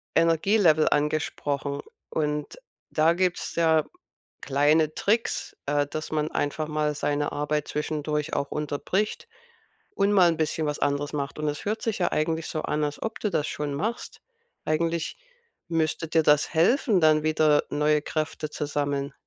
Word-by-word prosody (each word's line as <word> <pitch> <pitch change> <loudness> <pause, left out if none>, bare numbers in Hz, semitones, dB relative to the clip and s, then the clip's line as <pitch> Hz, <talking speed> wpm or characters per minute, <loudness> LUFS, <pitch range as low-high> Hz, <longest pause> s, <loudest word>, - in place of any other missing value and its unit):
Energielevel 165 -1 +4
angesprochen 145 -1 -1 0.3
und 150 - -2 0.3
da 160 +2 +4
gibt's 180 0 -1
ja 160 -2 +3 0.6
kleine 150 +3 +2
Tricks, 225 +3 0
äh, 145 0 +1
dass 155 +2 -5
man 155 0 0
einfach 150 +1 -2
mal 150 -1 0
seine 145 0 -1
Arbeit 150 0 -1
zwischendurch 150 0 -2
auch 140 -1 -2
unterbricht 150 +8 -2 0.7
und 200 +1 +2
mal 180 -3 +6
'n 165 - -3
bisschen 160 0 0
was 150 - -2
anderes 145 0 0
macht. 140 -1 -3
Und 155 - -1
es 145 - -5
hört 215 +2 -1
sich 225 -4 -1
ja 175 - +1
eigentlich 160 +1 0
so 155 - -3
an, 150 0 -1
als 145 - -5
ob 225 0 -4
du 210 - -1
das 160 -5 0
schon 145 -1 -3
machst. 215 +12 -4 0.4
Eigentlich 165 +1 -1 0.5
müsste 165 0 0
dir 160 0 +2
das 150 0 +3
helfen, 195 - +3
dann 155 -1 +4
wieder 155 -1 +3
neue 150 +1 +2
Kräfte 155 0 -3
zu 150 - -4
sammeln. 145 -1 -2
155 Hz, 155 wpm, -26 LUFS, 145-165 Hz, 0.7 s, mal